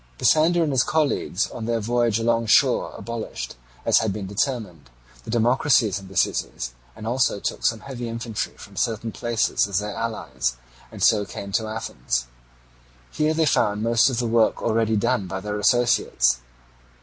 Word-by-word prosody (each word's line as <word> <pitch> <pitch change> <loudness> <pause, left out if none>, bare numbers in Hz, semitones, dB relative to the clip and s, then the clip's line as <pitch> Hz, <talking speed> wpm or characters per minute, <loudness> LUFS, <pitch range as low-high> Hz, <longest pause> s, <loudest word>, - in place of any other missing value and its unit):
Pisander 165 +2 +4
and 155 - 0
his 130 -2 +3
colleagues 145 - 0
on 115 - -6
their 115 0 0
voyage 120 0 +1
alongshore 115 -1 +3
abolished, 110 - -6 0.3
as - - +5
had 110 -2 0
been 100 0 -5
determined, 100 - -3 0.4
the - - -9
democracies 120 -2 +3
in 95 - -12
the 95 -1 -9
cities, - - -1 0.2
and 110 - -9
also 120 -3 +1
took - - -4
some 115 -2 +1
heavy 125 -3 -6
infantry 115 -2 -4
from 100 - -13
certain 115 +1 -1
places 115 -2 0
as 100 -2 -1
their 105 +1 -2
allies, 80 - -3 0.3
and - - -5
so 105 -2 +5
came 100 0 -7
to 110 +2 0
Athens. - - -3 0.9
Here 155 +1 +1
they 160 0 +2
found 105 -6 +1
most 115 +2 +4
of 125 - -3
the 120 - 0
work 115 -1 +2
already 110 -1 +1
done 100 -1 0
by 95 +1 -4
their 105 +1 -4
associates. 105 - +3
110 Hz, 165 wpm, -23 LUFS, 100-120 Hz, 0.9 s, as